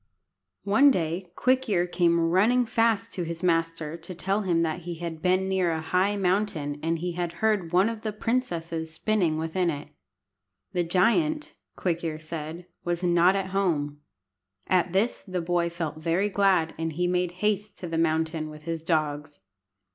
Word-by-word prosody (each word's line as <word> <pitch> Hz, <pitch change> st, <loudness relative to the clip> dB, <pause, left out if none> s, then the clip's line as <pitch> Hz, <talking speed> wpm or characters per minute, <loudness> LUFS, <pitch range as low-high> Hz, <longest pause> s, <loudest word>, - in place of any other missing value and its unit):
One 220 Hz, +9 st, +5 dB
day 175 Hz, -, -1 dB
Quick 260 Hz, -1 st, +2 dB
ear 175 Hz, -4 st, +2 dB
came 170 Hz, -1 st, +2 dB
running 200 Hz, +9 st, +3 dB
fast 225 Hz, 0 st, +1 dB
to 180 Hz, -, -3 dB
his 170 Hz, +1 st, -5 dB
master 165 Hz, -2 st, 0 dB
to 170 Hz, +2 st, -9 dB
tell 195 Hz, +4 st, 0 dB
him 170 Hz, -4 st, +1 dB
that 160 Hz, +1 st, -1 dB
he 175 Hz, 0 st, -6 dB
had 165 Hz, -1 st, -6 dB
been 185 Hz, +1 st, +2 dB
near 190 Hz, -2 st, +1 dB
a 160 Hz, -, -1 dB
high 185 Hz, +5 st, +1 dB
mountain, 180 Hz, -7 st, 0 dB
and 165 Hz, +1 st, 0 dB, 0.2 s
had 175 Hz, -1 st, -3 dB
heard 195 Hz, -2 st, 0 dB
one 185 Hz, +3 st, +4 dB
of 225 Hz, -1 st, -4 dB
the 215 Hz, -, -2 dB
princesses 170 Hz, -9 st, -2 dB
spinning 175 Hz, -2 st, +1 dB
within 165 Hz, +3 st, 0 dB
it. 145 Hz, -2 st, -5 dB, 0.8 s
The 175 Hz, -1 st, +1 dB
giant, 235 Hz, -, +1 dB, 0.2 s
Quick 170 Hz, -2 st, -1 dB
ear 160 Hz, -2 st, -2 dB
said, 155 Hz, +2 st, -6 dB, 0.2 s
was 175 Hz, +1 st, -2 dB
not 175 Hz, +2 st, +4 dB
at 190 Hz, -1 st, -2 dB
home. 150 Hz, -7 st, 0 dB, 0.6 s
At 180 Hz, -1 st, +2 dB
this 200 Hz, +6 st, +1 dB
the 185 Hz, -2 st, -4 dB
boy 170 Hz, 0 st, 0 dB
felt 165 Hz, -3 st, -4 dB
very 170 Hz, +5 st, +1 dB
glad, 190 Hz, -5 st, +2 dB
and 165 Hz, -1 st, -2 dB
he 175 Hz, +3 st, 0 dB
made 180 Hz, 0 st, 0 dB
haste 210 Hz, +2 st, -1 dB
to 180 Hz, -, -6 dB
the 165 Hz, -1 st, -1 dB
mountain 160 Hz, -1 st, 0 dB
with 150 Hz, 0 st, -11 dB
his 165 Hz, 0 st, -3 dB
dogs. 150 Hz, -, -1 dB
175 Hz, 170 wpm, -26 LUFS, 165-195 Hz, 0.8 s, One